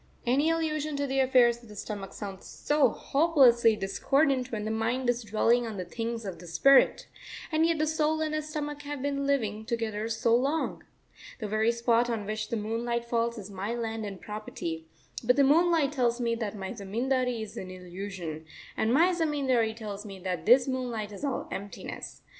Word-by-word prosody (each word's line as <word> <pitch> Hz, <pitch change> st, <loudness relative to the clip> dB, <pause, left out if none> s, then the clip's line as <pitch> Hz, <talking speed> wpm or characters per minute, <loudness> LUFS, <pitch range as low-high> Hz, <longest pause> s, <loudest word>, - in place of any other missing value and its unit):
Any 275 Hz, +6 st, +3 dB
allusion 310 Hz, -2 st, -1 dB
to 285 Hz, 0 st, -1 dB
the 270 Hz, 0 st, 0 dB
affairs 245 Hz, -3 st, +4 dB
of 235 Hz, -, -16 dB
the 210 Hz, -, -11 dB
stomach 200 Hz, -1 st, -6 dB
sounds 195 Hz, -2 st, -7 dB
so 295 Hz, -1 st, +2 dB
hopelessly 265 Hz, -7 st, +4 dB
discordant 260 Hz, +6 st, +1 dB
when 210 Hz, -2 st, -3 dB
the 220 Hz, -, -2 dB
mind 230 Hz, +3 st, -1 dB
is 240 Hz, 0 st, -4 dB
dwelling 230 Hz, +3 st, +2 dB
on 215 Hz, -2 st, -6 dB
the 185 Hz, -, -4 dB
things 230 Hz, +4 st, -4 dB
of 185 Hz, -4 st, -6 dB
the 175 Hz, -, -11 dB
spirit, 265 Hz, +12 st, +5 dB, 0.5 s
and 320 Hz, +1 st, +3 dB
yet 335 Hz, -1 st, +1 dB
the 310 Hz, -, +1 dB
soul 315 Hz, 0 st, +1 dB
and 310 Hz, -1 st, -1 dB
the 310 Hz, -, 0 dB
stomach 295 Hz, -1 st, -5 dB
have 290 Hz, -2 st, -5 dB
been 280 Hz, -1 st, -1 dB
living 220 Hz, -6 st, 0 dB
together 225 Hz, -2 st, -2 dB
so 230 Hz, +1 st, +2 dB
long. 280 Hz, +6 st, 0 dB, 0.6 s
The 215 Hz, -, -3 dB
very 215 Hz, +2 st, +2 dB
spot 235 Hz, 0 st, +2 dB
on 225 Hz, -3 st, -2 dB
which 215 Hz, +1 st, -3 dB
the 230 Hz, -, -1 dB
moonlight 235 Hz, +2 st, -2 dB
falls 235 Hz, 0 st, 0 dB
is 205 Hz, -1 st, -8 dB
my 200 Hz, +4 st, -3 dB
landed 220 Hz, -4 st, -4 dB
property, 170 Hz, -6 st, -6 dB, 0.4 s
but 250 Hz, +2 st, +4 dB
the 280 Hz, -, +5 dB
moonlight 320 Hz, +1 st, +4 dB
tells 245 Hz, -4 st, +1 dB
me 235 Hz, -1 st, 0 dB
that 220 Hz, -3 st, -3 dB
my 190 Hz, -1 st, -5 dB
zamindari 240 Hz, +3 st, -1 dB
is 215 Hz, -, -9 dB
an 185 Hz, -, -6 dB
illusion, 180 Hz, -3 st, -7 dB, 0.3 s
and 220 Hz, -, +1 dB
my 340 Hz, +8 st, +4 dB
zamindari 270 Hz, -9 st, +1 dB
tells 210 Hz, -3 st, -6 dB
me 200 Hz, -3 st, -8 dB
that 180 Hz, 0 st, -3 dB
this 250 Hz, +3 st, +6 dB
moonlight 245 Hz, -5 st, -3 dB
is 205 Hz, -, -9 dB
all 275 Hz, -3 st, -2 dB
emptiness. 200 Hz, +1 st, -7 dB
235 Hz, 190 wpm, -28 LUFS, 210-275 Hz, 0.6 s, this